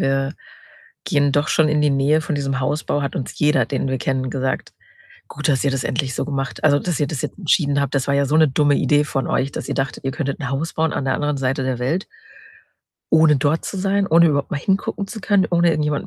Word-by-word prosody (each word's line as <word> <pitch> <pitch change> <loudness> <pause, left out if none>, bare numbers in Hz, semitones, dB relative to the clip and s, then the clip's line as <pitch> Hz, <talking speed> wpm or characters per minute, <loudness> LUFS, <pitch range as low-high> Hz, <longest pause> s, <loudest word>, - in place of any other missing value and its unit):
wir 135 +2 0 0.7
gehen 145 -1 +1
doch 145 +1 +1
schon 155 -1 +3
in 150 0 +1
die 150 -1 +3
Nähe 140 +3 +2
von 155 - -3
diesem 135 -1 -2
Hausbau, 145 +1 -1
hat 140 - -3
uns 130 - -5
jeder, 150 -5 +3
den 135 0 -2
wir 130 -1 -1
kennen, 130 -1 -2
gesagt: 130 0 -3 0.6
„Gut, 150 +2 -4
dass 135 -3 +1
ihr 140 - +2
das 135 -1 -2
endlich 130 0 -2
so - - -2
gemacht 135 -2 -4
also, 145 -2 +5
dass 175 -2 -2
ihr 145 - +2
das 145 -3 -4
jetzt - - -5
entschieden 145 -5 +1
habt, 140 - -3
das 135 -2 0
war 140 - +2
ja 140 0 +2
so 150 - -1
'ne 160 -2 +5
dumme 145 +1 +2
Idee 150 0 +2
von 135 -2 -2
euch, 135 +1 -1
dass - - -6
ihr - - -2
dachtet, 135 -1 -3
ihr 135 - 0
könntet 140 -1 -3
'n 135 - -3
Haus 145 +4 -2
bauen 160 0 0
an 135 - -2
der 135 - +1
anderen 145 0 -1
Seite 135 +1 -1
der 130 -2 -2
Welt“ 160 +10 -1 1.1
„ohne 160 -2 +5
dort 145 +4 0
zu 195 - -5
sein, 195 +1 +1
ohne 165 +1 +5
überhaupt 140 -2 -1
mal - - 0
hingucken 195 +4 -1
zu 215 0 -7
können, 200 -1 +2
ohne 170 -1 +3
irgendjemanden 150 -2 -1
145 Hz, 245 wpm, -20 LUFS, 135-155 Hz, 1.1 s, also